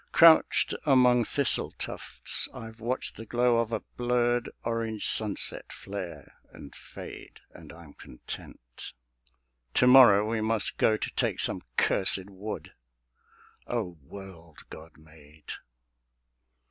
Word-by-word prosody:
Crouched 165 -1 +4
among 125 -4 +3
thistle 140 +1 0
tufts - - 0
I've 115 0 -11
watched 120 +3 -3
the 115 - -9
glow 120 0 +1
Of 115 -1 -2
a 115 - -3 0.2
blurred 120 0 0
orange 115 -2 -3
sunset 105 -2 +3
flare 95 -3 -9
and 70 - -13
fade; - - -12
And - - -14
I'm 80 -3 -15
content. - - -11 0.8
To - - +3
morrow 120 -5 +6
we 110 0 -2
must 110 0 -2
go 110 - +2
To - - -5
take - - -2
some - - +2 0.2
cursèd 95 +1 +2
Wood.... 100 +3 -8 0.9
O 95 -9 -5
world 85 0 -13
God 80 0 -12
made! 80 -1 -16
110 Hz, 120 wpm, -27 LUFS, 90-120 Hz, 0.9 s, morrow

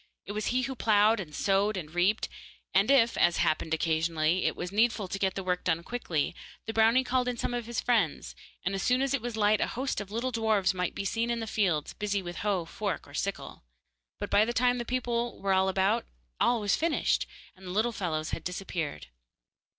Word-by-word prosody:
It - - -6
was 210 +1 -2
he 255 +1 +1
who 265 +1 -2
ploughed 220 -2 +3
and 150 -6 -7
sowed 200 +1 +1
and 155 -3 -6
reaped, 185 +5 +2 0.5
and 195 +4 +4
if, 245 -4 +5
as 175 - +4
happened, 160 +1 +1
occasionally, 160 +1 +1
it - - +1
was 175 +1 -5
needful 220 -1 +2
to 195 - -4
get 190 -1 0
the 195 - -3
work 180 -1 -1
done 170 -1 0
quickly, 175 -10 -2 0.3
the 225 - -4
brownie 225 +4 +4
called 250 0 0
in 245 -1 -1
some 245 - -2
of 240 -2 -3
his 235 -1 -2
friends, 220 -11 0 0.3
and 195 - 0
as 195 - -2
soon 250 +2 +2
as 275 0 0
it 275 - 0
was 240 -1 -4
light 210 0 +3
a - - +2
host 260 -2 -2
of 200 - -8
little 235 +5 -2
dwarfs 215 -5 +2
might 180 -1 -2
have - - -29
been 200 - -3
seen 230 +3 0
in 235 -1 0
the 225 - -3
fields, 185 -9 0
busy 205 -2 -2
with 175 0 -6
hoe, 195 -5 0
fork 200 +4 -4
or 140 - -15
sickle. 200 +6 -4 0.6
But - - -4
by 205 - +5
the 235 +2 -1
time 245 +1 +2
the 240 - -3
people 240 -1 -2
were 195 -1 +1
about 190 +4 +2 0.3
all 240 -2 +3
was 205 -1 +2
finished, 330 0 +1 0.3
and 190 0 -13
the - - -5
little 215 +6 +1
fellows 165 -7 -3
had - - -4
disappeared. 175 - -4
205 Hz, 220 wpm, -29 LUFS, 180-235 Hz, 0.6 s, if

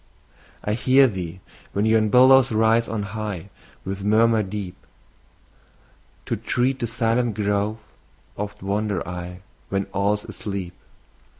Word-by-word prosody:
I 105 - -1
hear 130 +4 +5
thee, 95 -4 -6 0.3
when 100 +2 +1
yon 110 -1 +3
billows 130 +2 +6
rise 110 +1 +3
on 110 -2 -3
high, 105 -4 -5 0.3
With 95 +1 -4
murmur 110 +2 +4
deep. 95 -2 -5 1.5
To - - -1
tread 130 +2 0
the 120 - -1
silent 115 0 0
grove 105 +1 0 0.6
oft 105 -1 -6
wander 100 -3 -1
I, 90 +1 -7 0.3
When 100 0 -1
all's 105 +1 0
asleep. 100 -4 -5
105 Hz, 120 wpm, -23 LUFS, 100-115 Hz, 1.5 s, billows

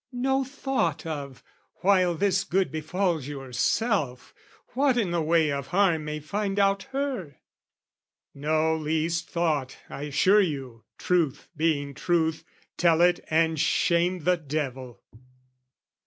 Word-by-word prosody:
"No 265 +2 0
thought 265 - -2
of, 140 -5 -6 0.4
while 185 -3 +3
this 195 +1 +1
good 190 +1 0
befalls 160 -1 -1
yourself, 135 - -1 0.4
"What 265 0 +1
in 205 -7 0
the 170 -1 0
way 160 -1 +2
of 140 -1 -3
harm 175 -4 +2
may 150 0 -4
find 200 +6 -3
out 195 -1 +2
her?" 260 - -3 1.0
No 155 +2 +1
least 160 +2 -1
thought, 155 -6 -1
I 140 +2 -5
assure 185 +8 +4
you: 135 - -4
truth 160 -6 0
being 145 -3 0
truth, 160 0 0 0.3
Tell 165 -2 +3
it 175 0 +4
and 160 0 +2
shame 175 +1 +1
the 180 +2 +3
devil! 135 -5 -5
165 Hz, 125 wpm, -26 LUFS, 150-190 Hz, 1.0 s, assure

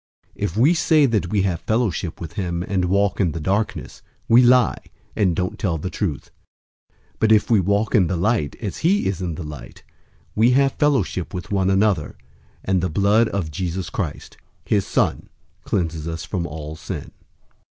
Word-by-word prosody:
001:006 - - -7
If 85 - -2
we 140 +9 +5
say 160 -3 +4
that 110 -9 0
we 100 0 +1
have 90 -4 -1
fellowship 110 -7 -1
with 85 -1 -7
him 85 -3 -2
and 95 -1 -1
walk 100 +1 +1
in 85 -5 +1
the 80 - -4
darkness, 100 +7 -2 0.3
we 120 +2 +6
lie, 125 -2 +4 0.3
and 95 -5 +2
don't 90 +1 -2
tell 85 -5 0
the 90 +5 -5
truth. 85 -10 -3 0.6
001:007 - - -39 0.2
But 110 - +3
if 110 +3 +4
we 110 - +5
walk 100 +3 0
in 100 -8 +4
the 90 - -1
light, 95 - 0
as 105 -5 -5
he 195 +6 +2
is 95 -2 -2
in 85 -3 -3
the 85 - -6
light, 75 -3 -10 0.5
we 115 +4 +4
have 135 0 +3
fellowship 115 - 0
with 90 - -6
one 95 -2 +1
another, 95 -6 +1 0.5
and 95 -2 +1
the 90 - -1
blood 100 +7 +3
of 90 -6 -3
Jesus 85 +2 -4
Christ, 80 -8 -5 0.3
his 100 -3 +1
Son, - - 0 0.4
cleanses 80 -4 -2
us 80 0 -5
from 90 -4 -3
all 75 +1 -7
sin. 80 - -7
95 Hz, 185 wpm, -22 LUFS, 85-110 Hz, 0.6 s, we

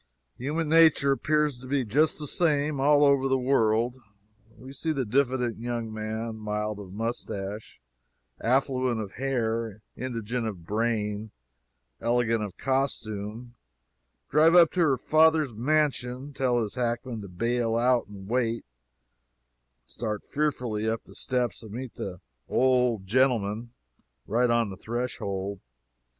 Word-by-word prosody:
Human 150 +5 -1
nature 160 -3 +5
appears 150 -1 +1
to 130 - -10
be 135 -1 0
just 145 +9 +2
the 150 - -4
same, 150 -2 +1
all 145 +1 +5
over 140 -1 +4
the 135 0 +2
world. 120 -2 +2 0.6
We 130 +4 -11
see 160 +4 -2
the 135 -4 -1
diffident 125 -1 +1
young 120 -2 -3
man, 110 +1 -4
mild 105 0 -3
of 95 -3 -9
moustache, 105 -1 -5 0.6
affluent 130 -1 +1
of 105 -3 -5
hair, 115 -5 -2
indigent 120 -1 -3
of 90 -6 -7
brain, 105 0 -1 0.7
elegant 115 -1 +1
of 100 -3 -7
costume, 120 -4 -2 0.7
drive 160 +3 +5
up 170 -3 +7
to 185 - -3
her 150 -6 +4
father's 155 -1 +3
mansion, 135 +1 0
tell 125 -3 +1
his 105 - -5
hackman 120 -1 -2
to 100 - -8
bail 115 +5 0
out 120 +1 +2
and 100 -2 -10
wait, 115 0 0 1.2
start 105 - -4
fearfully 125 -8 -1
up 115 0 -2
the - - -16
steps 125 -3 -2
and 110 -3 -10
meet 125 +1 -6
"the 90 -3 -6 0.3
old 125 -5 +2
gentleman" 115 -1 +1 0.6
right 120 +4 +2
on 120 -3 +2
the 95 - -8
threshold! 100 -4 -3
120 Hz, 135 wpm, -27 LUFS, 110-135 Hz, 1.2 s, up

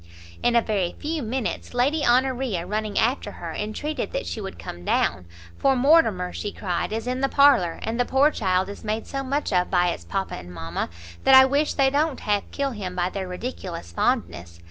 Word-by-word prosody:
In 240 - +2
a 235 - +5
very 195 -5 -1
few 310 +1 -3
minutes, 245 0 -3
Lady 285 +5 +2
Honoria, 245 -6 +1
running 210 +2 -3
after 230 -3 +1
her, 165 -2 -7
entreated 215 +9 -3
that - - -2
she 220 - -4
would 195 -1 -7
come 85 - -8
down; 90 +1 0 0.3
"for 270 -1 +3
Mortimer," 245 - +3
she 205 - -4
cried, 180 -2 -3
"is 225 +1 -3
in 255 +1 -2
the 275 - +2
parlour, 265 -14 +4
and 225 +2 -3
the - - +4
poor 270 +4 +3
child 185 -5 0
is 200 - -9
made 220 +1 -2
so 275 - -4
much 270 -3 -2
of 180 0 +2
by 180 -1 +3
its - - -4
papa 195 -1 -3
and 90 0 -10
mama, 80 -1 -4 0.3
that 270 - +7
I 265 0 +10
wish 285 +3 +1
they 270 -1 +3
don't 290 0 0
half 205 -1 -1
kill 280 -1 -2
him 190 -6 -5
by 180 0 0
their 190 -2 -4
ridiculous 180 - -6
fondness. 85 0 -1
220 Hz, 205 wpm, -24 LUFS, 180-265 Hz, 0.3 s, I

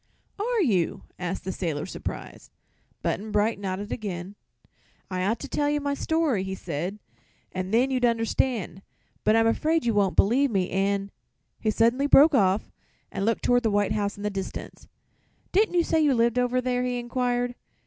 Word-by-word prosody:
"Are 460 +1 +1
you?" 190 - 0 0.2
asked 180 +1 -3
the 190 - -3
sailor, 160 -6 -3
surprised. - - -7 0.5
Button 210 +4 -2
Bright 210 +1 +1
nodded 200 +2 -4
again. 190 -3 -5 0.8
"I 185 0 -1
ought 215 +5 +1
to 280 - -5
tell 290 +1 0
you 295 0 +1
my 285 0 -1
story," 310 - 0
he 190 0 -4
said, 175 +3 -4 0.5
"and 185 0 -4
then 250 +4 +3
you'd 255 -1 0
understand. 230 -4 0 0.4
But 215 - +4
I'm 225 0 +4
afraid 310 +7 +1
you 230 - +2
won't 200 -2 +2
believe 265 +7 +4
me, 190 -5 0
and 195 +1 0 0.2
" - - -49
he 220 - 0
suddenly 235 +6 +2
broke 295 +2 +7
off 195 -4 +2 0.4
and 195 - -2
looked 230 0 0
toward 245 0 +3
the 225 - +1
white 205 -1 +1
house 200 -1 -1
in 205 - -8
the 210 - -1
distance 195 -1 -6 0.6
"Didn't 405 -1 +2
you 345 - +4
say 320 -1 +1
you 290 -4 +3
lived 235 +1 +2
over 250 0 +1
there?" 250 0 0
he 250 -1 -1
inquired. 245 0 -1
225 Hz, 180 wpm, -26 LUFS, 195-255 Hz, 0.8 s, broke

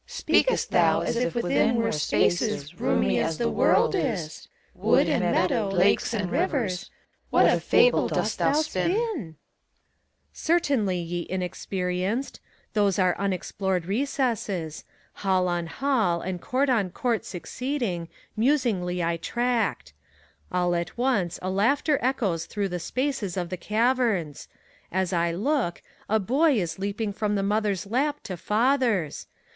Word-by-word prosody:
CHORUS. 485 - -10
Speakest - - +2
thou - - +3
as - - -1
if 245 +1 -1
within 235 +2 +2
were 230 -1 +1
spaces 175 +2 0
roomy 65 -1 +1
as 160 - -1
the 235 - 0
world - - +3
is: 200 - -2 0.3
Wood - - +3
and - - +1
meadow, 225 -7 +1
lakes 195 +3 +2
and 205 -6 -2
rivers, 205 - -1 0.2
— - - -43
what - - +4
a - - +4
fable - - +4
dost - - -1
thou - - +3
spin 310 +2 0
I - - +1
PHOBKTAS. 405 - -2 1.0
Certainly, 280 - +1
ye 175 0 -4
Inexperienced! 185 +5 -2 0.3
Those 200 -3 +2
are 185 -2 +3
unexplored 190 -1 -1
reeouies? 205 - -2 0.3
Hall 185 -2 +1
on 175 -1 -1
hall, 220 -6 0
and 180 -1 -4
court 270 +2 0
on 210 -7 +1
court 235 +4 -1
succeeding, 205 - -3 0.3
musingly 220 - +1
I 170 0 0
tracked. 230 - -1 0.6
All 180 -1 +1
at 170 +4 -3
once 235 -9 0
a 185 - -1
laughter 275 +9 +2
echoes 215 -10 0
through 205 -2 -2
the 180 0 -3
spaces 240 - -2
of 175 -2 -2
the - - -1
caverns; 215 - 0 0.4
As 190 0 0
I 170 0 +1
look, 210 - -1 0.3
a 220 +1 +3
Boy 280 - +3
is 170 -2 -3
leaping 205 +1 -2
from 210 0 -1
the 195 - 0
mother'a 205 -1 0
lap 285 +7 0
to 195 -5 -5
father's. 220 - 0
205 Hz, 145 wpm, -26 LUFS, 180-250 Hz, 1.0 s, what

